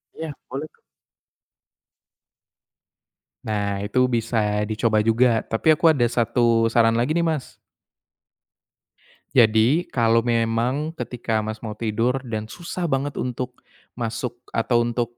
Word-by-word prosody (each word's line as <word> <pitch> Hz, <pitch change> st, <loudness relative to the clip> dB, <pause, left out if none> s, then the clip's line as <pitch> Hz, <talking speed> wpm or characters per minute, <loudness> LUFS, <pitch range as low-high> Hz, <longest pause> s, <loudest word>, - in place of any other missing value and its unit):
Iya, 160 Hz, 0 st, -5 dB, 0.2 s
boleh 140 Hz, +4 st, -5 dB
kok. -, -, -33 dB, 2.6 s
Nah, 100 Hz, -2 st, -2 dB
itu 105 Hz, +5 st, -1 dB
bisa 115 Hz, -1 st, 0 dB, 0.2 s
dicoba 110 Hz, 0 st, +1 dB
juga. 115 Hz, 0 st, +3 dB
Tapi 155 Hz, +8 st, +2 dB
aku 165 Hz, +2 st, +5 dB
ada 125 Hz, -6 st, +2 dB
1 115 Hz, -1 st, +2 dB
saran 115 Hz, -1 st, +4 dB
lagi 120 Hz, +5 st, +1 dB
nih, 170 Hz, +1 st, +1 dB
Mas. 155 Hz, -5 st, -3 dB, 1.8 s
Jadi, 115 Hz, +8 st, +4 dB
kalau 115 Hz, -1 st, +3 dB
memang 120 Hz, +6 st, 0 dB
ketika 120 Hz, -5 st, -3 dB
Mas 110 Hz, +1 st, -5 dB
mau 110 Hz, -, -4 dB
tidur 115 Hz, +4 st, -1 dB
dan 110 Hz, -4 st, -4 dB
susah 175 Hz, +8 st, -5 dB
banget 140 Hz, -2 st, -1 dB
untuk 125 Hz, 0 st, -5 dB, 0.3 s
masuk 120 Hz, +1 st, -4 dB, 0.2 s
atau 120 Hz, +1 st, +2 dB
untuk 120 Hz, 0 st, -3 dB
120 Hz, 120 wpm, -23 LUFS, 115-130 Hz, 2.6 s, aku